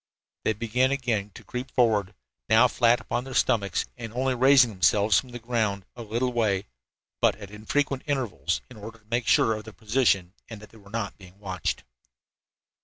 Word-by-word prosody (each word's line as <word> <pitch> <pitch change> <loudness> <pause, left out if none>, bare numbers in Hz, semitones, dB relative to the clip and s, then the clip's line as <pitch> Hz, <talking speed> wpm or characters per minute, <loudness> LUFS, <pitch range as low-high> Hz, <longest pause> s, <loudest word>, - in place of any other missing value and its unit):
They 110 - +2
began 120 +4 +1
again 120 -7 -1
to - - -11
creep 125 +2 -6
forward, 105 -6 +1 0.3
now 115 +3 +6
flat 120 0 +3
upon 120 - -3
their 130 -1 -8
stomachs, 100 -4 +1
and 115 -3 -7
only 130 +2 0
raising 130 -1 +5
themselves 100 0 +3
from 125 - -9
the 120 - -7
ground 110 -5 -1
a 120 - -8
little 120 +3 -2
way, 105 -5 +1 0.6
but - - +4
at 100 -2 -11
infrequent 130 +6 -1
intervals, 120 -10 -1
in 125 - -14
order 110 +2 -9
to 110 - -29
make 115 +2 -2
sure 115 - +4
of 110 0 -5
their 110 - -10
position 105 -6 +1 0.2
and 110 -3 -8
that 105 0 -14
they 115 - -16
were 100 -1 -17
not 110 -2 -4
being 95 0 -15
watched. 95 -3 -3
115 Hz, 185 wpm, -26 LUFS, 105-125 Hz, 0.6 s, now